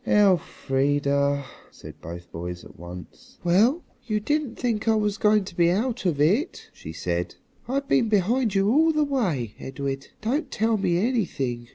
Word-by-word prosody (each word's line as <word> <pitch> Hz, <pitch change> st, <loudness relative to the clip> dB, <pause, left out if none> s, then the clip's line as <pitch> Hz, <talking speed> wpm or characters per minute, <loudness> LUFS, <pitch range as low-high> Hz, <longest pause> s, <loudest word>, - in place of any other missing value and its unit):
"Elfrida!" 140 Hz, -7 st, +2 dB, 0.2 s
said -, -, -13 dB
both 85 Hz, +1 st, -9 dB
boys 90 Hz, +1 st, -6 dB
at -, -, -14 dB
once. 85 Hz, 0 st, -11 dB
"Well, 220 Hz, -, +3 dB, 0.2 s
you 215 Hz, -2 st, 0 dB
didn't 290 Hz, +1 st, -1 dB
think 225 Hz, -3 st, -2 dB
I 225 Hz, -, +4 dB
was 210 Hz, -1 st, 0 dB
going 210 Hz, -1 st, +4 dB
to 185 Hz, -2 st, -10 dB
be 170 Hz, -1 st, +4 dB
out 220 Hz, +3 st, 0 dB
of 155 Hz, -5 st, 0 dB
it," 205 Hz, -, +1 dB
she 80 Hz, -, -9 dB
said. 85 Hz, +1 st, -3 dB, 0.3 s
"I've 275 Hz, +2 st, -1 dB
been 235 Hz, -4 st, +2 dB
behind 215 Hz, +2 st, +2 dB
you 195 Hz, 0 st, +3 dB
all 320 Hz, +5 st, +4 dB
the 305 Hz, -1 st, +2 dB
way, 180 Hz, -, -1 dB
Edred. 135 Hz, 0 st, -4 dB
Don't 270 Hz, +7 st, -1 dB
tell 225 Hz, -3 st, +1 dB
me 180 Hz, -4 st, +1 dB
anything. 170 Hz, -, -1 dB
195 Hz, 165 wpm, -25 LUFS, 140-235 Hz, 0.3 s, I